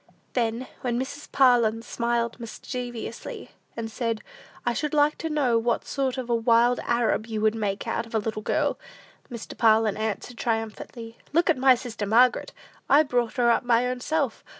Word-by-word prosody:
Then, 235 0 -1
when 240 -1 -1
Mrs. 285 +3 -6
Parlin 235 -4 +4
smiled 235 0 -1
mischievously, 240 0 -6 0.3
and 225 -1 -4
said, 230 -2 -2 0.4
"I 240 - +1
should 300 +4 -2
like 295 0 +4
to 325 - -3
know 265 -7 +2
what 235 +1 0
sort 270 -2 -1
of 255 -2 -4
a 240 - 0
wild 235 +1 +3
Arab 235 -2 0
you 220 -2 -3
would 215 0 +3
make 205 -3 -3
out 230 - -2
of 225 - -7
a - - +4
little 215 0 -3
girl," - - 0 0.5
Mr. 235 -2 -8
Parlin 220 -2 +3
answered 220 +2 -4
triumphantly, 225 0 -4
"Look 340 +1 +4
at 315 - -1
my 260 0 +6
sister 235 -4 -5
Margaret! 240 +4 +4 0.4
I 290 +3 +7
brought 245 -3 -1
her 240 -1 +4
up - - +2
my 240 0 +3
own 250 0 -2
self! 285 -2 -1
235 Hz, 175 wpm, -26 LUFS, 225-255 Hz, 0.5 s, I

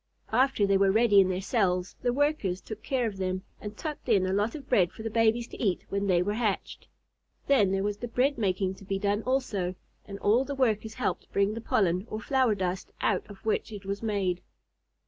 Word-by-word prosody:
After 255 -2 +3
they 195 -1 +3
were 195 0 +4
ready 215 -1 +5
in 190 -1 +5
their 185 0 -1
cells, 185 -4 0
the 245 - +1
Workers 270 -9 0
took 215 +1 -8
care 260 -3 0
of 210 -3 -3
them, 185 0 -2 0.2
and 210 0 -8
tucked 300 -4 -6
in 200 -5 +4
a 185 - 0
lot 210 +5 0
of 285 -3 -9
bread 185 -9 +3
for 220 - -10
the 225 - -3
babies 230 +1 +2
to - - -9
eat 195 -6 0
when 200 0 -1
they 180 -2 +3
were 205 +3 -1
hatched. 215 -3 -2 0.6
Then 240 -9 +4
there 195 0 0
was 205 0 -1
the 240 - -5
bread 255 +4 +1
making 190 -2 0
to - - -13
be 195 0 -2
done 205 +1 0
also, 220 -8 -1 0.3
and 200 - -6
all 220 +6 +3
the 280 +1 -5
Workers 220 -4 0
helped 255 - -3
bring 200 +1 +2
the 230 - -5
pollen, 185 -2 +1
or 215 - -4
flower 255 -1 +2
dust, 185 -1 -3
out 200 -1 0
of 205 0 -13
which 220 0 0
it 205 -2 -8
was 200 +1 -3
made. 195 -5 -1
205 Hz, 225 wpm, -28 LUFS, 195-230 Hz, 0.6 s, ready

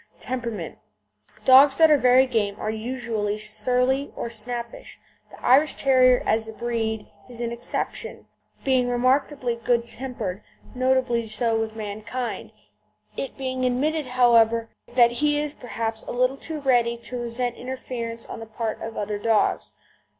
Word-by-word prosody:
TEMPERAMENT 235 -9 -5 0.7
Dogs 270 +1 +7
that 320 -1 +6
are - - +8
very 255 -1 +5
game 210 -5 -1
are 215 - -2
usually 220 -2 -3
surly 250 +6 0
or 235 - -4
snappish. 235 +1 -5 0.3
The - - -14
Irish 285 +4 +5
Terrier 255 -2 +4
as 220 0 +1
a 220 - -7
breed 225 -2 -2 0.2
is 240 -1 -10
an 235 -1 -2
exception, 235 +1 -4 0.4
being 260 -2 +2
remarkably 255 +1 +1
good 235 0 +1
tempered, 235 -6 -5 0.3
notably 255 -3 +1
so 225 +1 0
with 220 0 -3
mankind, 220 +4 -5 0.6
it 275 - -5
being 260 -1 -3
admitted, 285 +4 0
however, 230 -2 +4 0.2
that 240 -1 +4
he 295 -1 +3
is 295 -1 -2
perhaps 225 -3 -4
a - - -7
little 255 +2 +1
too 310 +2 -5
ready 240 -4 +2
to 240 +1 -7
resent 240 +1 -1
interference 240 -3 -6
on - - -8
the 225 - -8
part 220 0 -4
of 225 0 -6
other 205 0 -3
dogs. 220 0 +1
240 Hz, 145 wpm, -24 LUFS, 225-255 Hz, 0.7 s, are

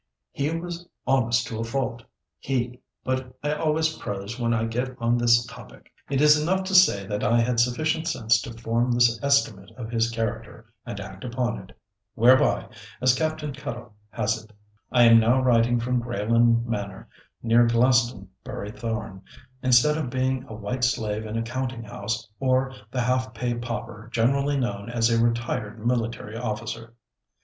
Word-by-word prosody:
He 140 +1 -1
was 170 +1 -5 0.2
honest 120 -3 +2
to 115 -6 -5
a - - -1
fault. 120 0 -3 0.4
He—but 125 0 -4
I 150 0 0
always 160 +1 0
prose 100 +4 -5
when 115 -1 0
I 115 -1 +1
get 125 +3 -3
on 115 0 +2
this 120 0 +4
topic. - - -13 0.2
It 140 0 +1
is 150 0 +6
enough 190 +4 +1
to 190 +1 -4
say 180 - +5
that 105 +1 -3
I 115 +2 +3
had 115 0 +1
sufficient 155 +7 +1
sense 115 -8 +2
to 115 - -7
form 115 +2 0
this 120 -1 +3
estimate 125 -8 +1
of 115 -2 -7
his 115 0 +1
character 115 0 -5
and 100 - -5
act 95 -1 -9
upon 120 -1 -2
it, 95 - -15 0.4
'whereby,' 125 +3 +4 0.3
as 130 -1 +4
Captain 155 0 -2
Cuttle 120 -4 -7 0.2
has 110 +2 -1
it, 110 - -19 0.4
I 125 -1 +5
am 115 -1 +8
now 115 +4 +3
writing 120 -1 +3
from 125 +1 0
Greyland 115 0 +2
Manor, 100 -4 -5 0.4
near 120 +1 +4
Glastonbury 115 -2 0
Thorn, 110 -4 -5 0.4
instead 130 +5 +4
of 130 - -3
being 130 0 -1
a 110 - -8
white 115 +4 -4
slave 110 -3 0
in 110 +1 -4
a 115 - -1
counting 125 0 -4
house, 105 +1 -4
or 130 0 +1 0.2
the 125 +1 -2
half 130 0 0
pay 120 +1 -1
pauper 115 -2 -6
generally 140 +5 +1
known 105 -4 -3
as 115 0 +1
a 115 0 +3
retired 115 -2 -2
military 115 -2 -1
officer. 115 0 -5
120 Hz, 165 wpm, -25 LUFS, 115-130 Hz, 0.4 s, am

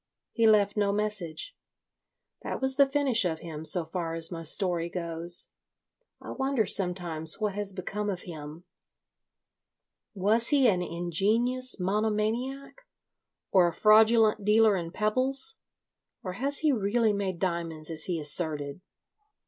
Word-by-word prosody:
He 230 -2 +1
left 205 -2 +3
no 205 -1 0
message. 210 - -3 0.9
That - - -5
was 265 0 +3
the 280 0 +3
finish 270 -5 +2
of 160 -3 -3
him 160 -2 -8
so 175 0 +5
far 165 -1 -5
as 165 +1 0
my 165 -1 -6
story 170 0 0
goes. 170 -1 +3 0.7
I - - -10
wonder 265 -4 -1
sometimes 175 -4 0
what 210 -2 -2
has 205 0 -2
become 200 +2 -5
of 185 -3 -4
him. 155 -1 -10 1.5
Was 215 +5 +1
he 280 -4 +3
an 185 -5 +1
ingenious 205 +10 -1
monomaniac, 220 - -3 0.7
or 185 -3 +4
a 170 - -3
fraudulent 220 0 +4
dealer 215 0 +3
in 170 -3 -4
pebbles, 260 - 0 0.7
or 185 - -5
has 275 +8 0
he 310 -2 +2
really 220 -1 0
made 195 -3 -3
diamonds 170 -3 -4
as 155 -1 -1
he 175 -2 -2
asserted? 150 0 -1
200 Hz, 135 wpm, -27 LUFS, 170-225 Hz, 1.5 s, so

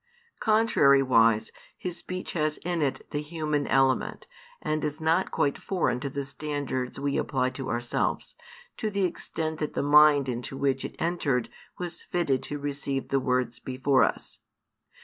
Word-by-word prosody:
Contrariwise, 135 - +4 0.3
His 180 -2 -5
speech 185 0 -6
has 155 -2 0
in 175 -2 0
it 140 -3 -1
the 145 - -1
human 150 -2 -2
element, 135 -1 +2 0.3
and 155 0 -2
is 150 +1 -2
not 165 +4 +2
quite 140 - 0
foreign 175 -10 0
to 140 +1 -3
the 140 +1 -3
standards 140 -3 -4
we 140 0 0
apply 130 -1 0
to 130 +1 -6
|338 - - -4
ourselves, 120 0 -1 0.4
to 220 - -1
the 200 -1 -1
extent 160 -3 -3
that 150 - -3
the - - 0
mind 145 -1 +6
into 125 +2 -4
which 135 -1 0
it - - -6
entered 150 -8 0 0.3
was 175 -1 -5
fitted 145 -7 0
to 145 - -4
receive 140 -1 -3
the 135 - +2
words 125 -2 0
before 130 +1 +2
us. - - -2
145 Hz, 160 wpm, -27 LUFS, 130-160 Hz, 0.4 s, mind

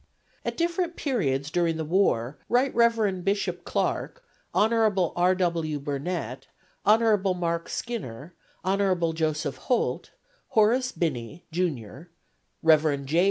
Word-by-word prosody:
At - - -3
different 340 0 0
periods 145 - -1
during 170 -2 +1
the 160 - -3
war 150 -8 +1
Rt. 250 +2 +2
Rev. 225 -6 +2
Bishop 200 +2 -1
Clark, - - -2 0.3
Hon. 220 +2 +3 0.4
R. 180 +1 +3
W. 165 -5 -1
Burnet, 140 -2 -4 0.4
Hon. 215 -1 +4 0.2
Mark 170 -1 -1
Skinner, 170 - -5 0.3
Hon. 185 -3 +1
Joseph 155 -4 -1
Holt, 250 - -1 0.4
Horace 240 +4 +3
Binney, 150 - -3
Jr., 160 - -3 0.5
Rev. 155 -3 +4
J. 155 +5 +1
175 Hz, 115 wpm, -26 LUFS, 150-215 Hz, 0.5 s, Hon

